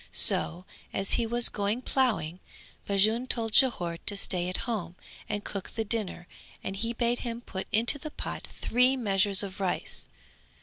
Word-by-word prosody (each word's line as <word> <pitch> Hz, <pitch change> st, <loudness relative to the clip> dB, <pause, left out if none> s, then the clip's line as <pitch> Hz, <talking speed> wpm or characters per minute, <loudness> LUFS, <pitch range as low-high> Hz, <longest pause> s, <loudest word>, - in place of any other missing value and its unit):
So, 175 Hz, +3 st, +3 dB, 0.3 s
as 195 Hz, 0 st, -1 dB
he 230 Hz, -, +2 dB
was 240 Hz, +1 st, +3 dB
going 210 Hz, +4 st, -1 dB
ploughing, 205 Hz, -, 0 dB, 0.5 s
Bajun 215 Hz, +5 st, +3 dB
told 225 Hz, -3 st, -1 dB
Jhore 175 Hz, -11 st, +3 dB
to 205 Hz, -, +8 dB
stay 180 Hz, -2 st, -1 dB
at 185 Hz, -, -2 dB
home 185 Hz, -8 st, -3 dB, 0.3 s
and 205 Hz, 0 st, -2 dB
cook 200 Hz, -2 st, -5 dB
the 225 Hz, -, -3 dB
dinner 200 Hz, -5 st, 0 dB, 0.4 s
and 195 Hz, -, -4 dB
he 230 Hz, +4 st, -2 dB
bade 235 Hz, 0 st, 0 dB
him 235 Hz, -1 st, -4 dB
put 190 Hz, -5 st, -6 dB
into 235 Hz, +6 st, +3 dB
the 310 Hz, -, -6 dB
pot -, -, -5 dB
three 250 Hz, +3 st, +1 dB
measures 200 Hz, -3 st, +2 dB
of 195 Hz, 0 st, -7 dB
rice. 190 Hz, -2 st, -2 dB
210 Hz, 165 wpm, -29 LUFS, 190-235 Hz, 0.5 s, to